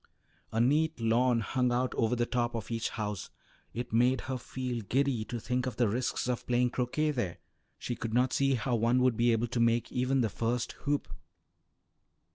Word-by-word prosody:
A 110 - -1
neat 150 +5 +2
lawn 115 +1 +3
hung 125 +3 0
out 125 +1 0
over 115 +1 +1
the 120 0 +1
top 120 -1 -1
of 115 0 -5
each 115 0 -1
house; 105 -4 -4 0.4
it 120 -1 -5
made 125 +2 +3
her 130 -1 -4
feel 125 -1 -4
giddy 130 +1 0
to 120 - -4
think 125 +3 -1
of 125 - -4
the 120 0 +2
risks 120 +4 -1
of 125 -1 -2
playing 125 0 +2
croquet 130 +5 0
there; 110 - -2 0.4
she 120 - -4
could 115 - -4
not 125 +3 +2
see 135 -1 +2
how 125 +2 -2
one 120 +2 +3
would 130 -2 +3
be 120 +2 +3
able 115 +1 +2
to 120 - -2
make 115 0 +2
even 130 +1 +1
the 115 - +1
first 120 +2 -1 0.2
hoop. 145 0 0
120 Hz, 195 wpm, -30 LUFS, 115-125 Hz, 0.4 s, lawn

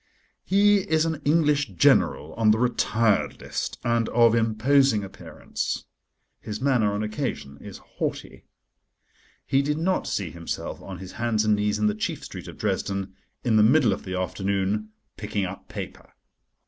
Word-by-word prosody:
He 205 +1 +4
is 160 0 +3
an 160 -2 -2
English 145 - +2
General 80 - +3
on 115 -1 +2
the 105 - +5
Retired 115 -3 +1
List, - - -4
and 115 -1 +1
of 115 -1 +5
imposing 115 +1 +3
appearance: 95 - -5 0.5
his 105 0 -6
manner 125 -6 +2
on 105 +1 -2
occasion 70 -9 -4
is - - -9
haughty. - - -6 1.0
He 135 - +2
did 150 +2 -1
not 185 +4 0
see 95 -6 -2
himself 85 0 -5
on 95 -1 -8
his 95 0 -9
hands 110 -2 0
and 105 -1 +4
knees 105 0 0
in 105 - 0
the 105 - +3
chief 105 - -3
street - - -8
of - - -10
Dresden, 100 -1 -2 0.3
in 115 -3 +3
the - - +6
middle 120 0 +5
of - - -6
the 95 -1 -4
afternoon, 100 +3 -1 0.3
picking 105 -2 -2
up 95 +1 -8
paper. - - -8
110 Hz, 160 wpm, -25 LUFS, 100-135 Hz, 1.0 s, the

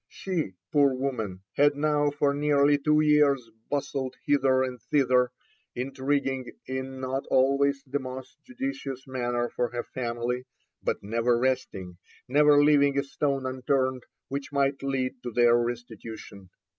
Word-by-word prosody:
She, 170 - -3 0.2
poor 140 -3 +4
woman, 110 -8 -3
had 145 0 +4
now 145 0 +2
for 145 -1 +1
nearly 145 0 +3
two 150 +1 +3
years 145 -5 +3 0.2
bustled 135 -2 -2
hither 135 -2 +3
and 125 -2 -5
thither, 125 -3 +2 0.5
intriguing 135 0 -2
in 130 0 -5
not 130 +1 -3
always 140 +1 +2
the 140 +2 -2
most 130 0 -8
judicious 250 - -5
manner 120 -2 -1
for 120 - -1
her 120 -1 -4
family, 120 0 -3 0.4
but - - -2
never 115 +3 +1
resting, 120 -8 -2 0.3
never 145 +2 +5
leaving 145 -1 +4
a 140 - +2
stone 140 -1 -1
unturned 130 0 0 0.3
which 140 +1 -5
might 140 -1 +1
lead 135 -2 -2
to 125 - -5
their 120 0 +4
restitution. 115 -5 -5
130 Hz, 135 wpm, -27 LUFS, 125-145 Hz, 0.5 s, never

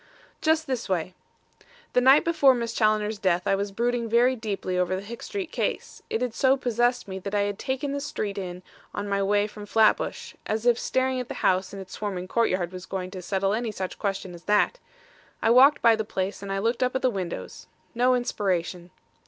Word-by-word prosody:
"Just 315 0 +2
this 255 -6 -3
way. 180 -1 -1 0.8
The 250 - +4
night 265 +3 +6
before 285 -6 +5
Miss 235 -1 -3
Challoner's 215 -1 +1
death 180 -2 +1
I - - +2
was 200 +1 -1
brooding 235 +2 -1
very 245 +3 +4
deeply 205 -5 -3
over 180 +1 +1
the 190 - -5
Hicks 230 +3 -8
Street 390 -5 -4
case. - - -3
It 225 - -1
had 245 -3 -2
so 265 +3 +3
possessed 245 -1 0
me 190 0 -5
that 200 +2 -4
I 205 - +3
had 200 0 -2
taken 265 +2 -2
this 280 0 -3
street 200 -1 -3
in 180 -1 -6 0.3
on 205 0 -3
my 200 0 0
way 205 +1 +2
from 210 0 -9
Flatbush; 220 0 +2
as 215 +2 -2
if 240 -1 +4
staring 260 0 0
at 250 - -4
the - - -6
house 185 0 +2
and 200 - -8
its 190 -1 -10
swarming 190 -3 -4
courtyard 185 -5 0
was 185 -1 -9
going 185 -1 -4
to 185 -1 -7
settle 195 +2 0
any 225 0 -1
such 190 -3 -5
question 195 -3 -3
as 170 0 -12
that! 210 - +2 0.6
I 225 - +2
walked 270 +4 +6
by 230 -1 +6
the 220 - -2
place 195 -2 -3
and 200 -1 -6
I 195 - -1
looked 230 +5 0
up 255 0 +1
at 260 - -1
the 255 - +3
windows. 190 -5 -6 0.3
No 250 +1 +3
inspiration. 180 -7 -2
210 Hz, 215 wpm, -26 LUFS, 190-245 Hz, 0.8 s, night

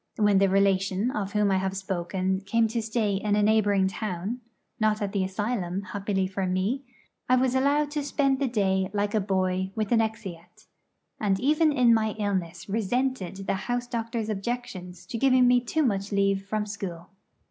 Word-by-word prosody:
When 205 -2 +3
the 195 0 +4
relation 195 +3 +2
of 200 -5 -3
whom 210 -1 +2
I 190 - +3
have 190 0 -2
spoken 190 0 -2
came 225 +3 +2
to 230 +1 -1
stay 215 -2 0
in 205 +1 0
a 210 - +2
neighbouring 205 -3 +3
town 195 +4 -4 0.4
not 215 -1 +2
at 200 -1 -2
the 200 -2 0
asylum, 190 -1 -2
happily 195 0 -2
for 190 0 -2
me 190 +9 0 0.5
I 255 - +6
was 255 0 +2
allowed 285 +3 +2
to 295 -1 -2
spend 275 -2 +1
the 275 - +1
day 190 -5 +1
like 205 0 0
a 215 - +3
boy 190 -1 0
with 215 -1 -2
an 230 -1 +5
exeat, 215 -7 -6 0.5
and 195 -3 +1
even 305 +4 +3
in 250 -5 +4
my 220 -1 +1
illness 185 -5 -2
resented 215 -2 -1
the - - 0 0.2
house 245 0 0
doctor's 230 -2 -3
objections 195 -5 -5
to 230 - -5
giving 255 -1 +5
me 245 0 +5
too 310 +6 0
much 200 -5 -1
leave 195 -1 +1
from 215 +1 -1
school. 190 -4 -7
205 Hz, 180 wpm, -26 LUFS, 190-235 Hz, 0.5 s, I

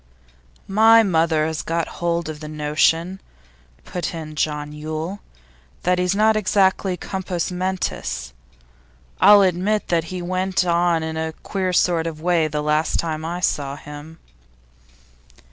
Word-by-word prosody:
'My 225 +3 +6
mother 160 -5 +2
has 160 0 -2
got 165 0 -2
hold 170 -1 0
of 155 -1 -6
the 155 - -8
notion,' 155 +4 0 0.6
put 180 -1 -4
in 155 -2 -7
John 150 -1 -2
Yule, 155 +5 -5 0.6
'that 180 0 +2
he's 180 +1 +1
not 215 +1 +4
exactly 190 -2 +2
compos 185 -2 -3
mentis. 180 - -3 0.9
I'll 205 0 +8
admit 190 +4 0
that 165 -2 +1
he 185 +2 -5
went 185 +1 -1
on 170 -1 +2
in 160 0 -4
a 160 0 -3
queer 190 -2 -2
sort 170 -2 +2
of 160 -2 -6
way 170 -1 +2
the 150 -1 -3
last 150 +1 +1
time 160 -2 -2
I 170 +2 -4
saw 140 -5 -1
him. 150 +2 -11
170 Hz, 140 wpm, -21 LUFS, 155-185 Hz, 0.9 s, I'll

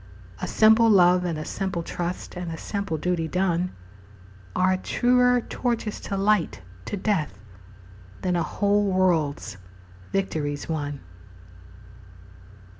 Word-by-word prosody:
A - - -2
simple 220 +1 +5
love 180 -3 +5
and 170 -3 -2
a 155 - -5
simple 190 -3 -3
trust 175 +3 -4
And 175 -1 -5
a 160 - -5
simple 200 -2 -3
duty 170 0 -1
done 180 0 0 0.8
Are 185 0 +3
truer 250 +5 +3
torches 230 -3 -2
to 195 - -4
light 200 - +1 0.3
to 205 - -4
death 185 - -1 0.9
Than 180 -1 +1
a 170 - +1
whole 205 +4 +1
world's 165 - +1 0.5
victories 150 -7 -2
won. 145 -3 -3
185 Hz, 115 wpm, -25 LUFS, 165-205 Hz, 0.9 s, simple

